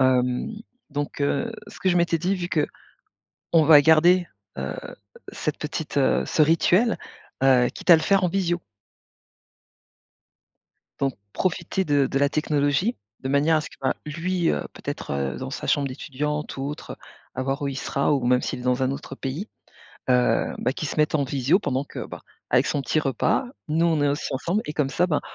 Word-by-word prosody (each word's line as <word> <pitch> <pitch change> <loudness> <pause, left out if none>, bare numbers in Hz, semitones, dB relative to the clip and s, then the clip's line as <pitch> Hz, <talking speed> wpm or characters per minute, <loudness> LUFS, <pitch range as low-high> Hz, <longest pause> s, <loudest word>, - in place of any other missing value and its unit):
Hem, 125 - +2 0.4
donc, 145 0 -4
heu, 225 +11 0 0.2
ce - - -13
que 190 - +1
je 180 - +3
m'étais 170 -1 +2
dit 185 +4 0
vu 175 -1 -4
qu'on 155 -4 -2 0.8
va 150 -1 +9
garder, 170 +4 +5 0.3
heu, 65 0 -3 0.6
cette 150 - -3
petite, 150 0 -5
heu, 135 - +3
ce 155 - +2
rituel, 175 +8 +3 0.5
heu, 125 -2 +5
quitte - - -1
à 170 - +11
le 160 - -2
faire 195 -2 +3
en - - +3
visio. 175 -1 0 2.4
Donc 135 -2 0 0.2
profiter 185 +1 -1
de 145 -4 +3
de 135 - -1
la 140 - +3
technologie, 150 - +1 0.2
de 130 - -4
manière 145 +4 +3
à - - +2
ce 150 - -7
que, - - -17
bah, 130 - +1
lui, 170 +2 0
heu, - - 0
peut-être 70 -1 -4
dans - - -5
sa - - -5
chambre 140 -1 +2
d'étudiant 150 +3 -3
ou - - -5
autre, 150 - -7 0.4
à 130 - -2
voir 135 +2 -2
où 140 - 0
il 135 - -4
sera 140 +2 0
ou 135 -4 +1
même 125 0 +3
s'il - - -3
est - - -8
dans 125 +1 +1
un 130 - +2
autre 135 - -7
pays, 145 - -4 0.6
heu, 125 -1 +2
bah, 125 - 0
qu'il 150 +2 -4
se - - -5
mette 150 0 +2
en 145 -2 +2
visio, 135 +6 +2
pendant 135 -8 -1
que, - - -7
ben, - - -9 0.3
avec - - +3
son 145 - 0
petit 135 +4 0
repas, 135 - +1 0.2
nous, 165 +3 +2
on 160 -3 +2
est 145 - +3
aussi 145 +1 -2
ensemble 170 +10 -1
et 150 - -4
comme 150 -2 0
ça, 175 +6 +2
ben, 155 -5 +1
150 Hz, 195 wpm, -24 LUFS, 135-170 Hz, 2.4 s, à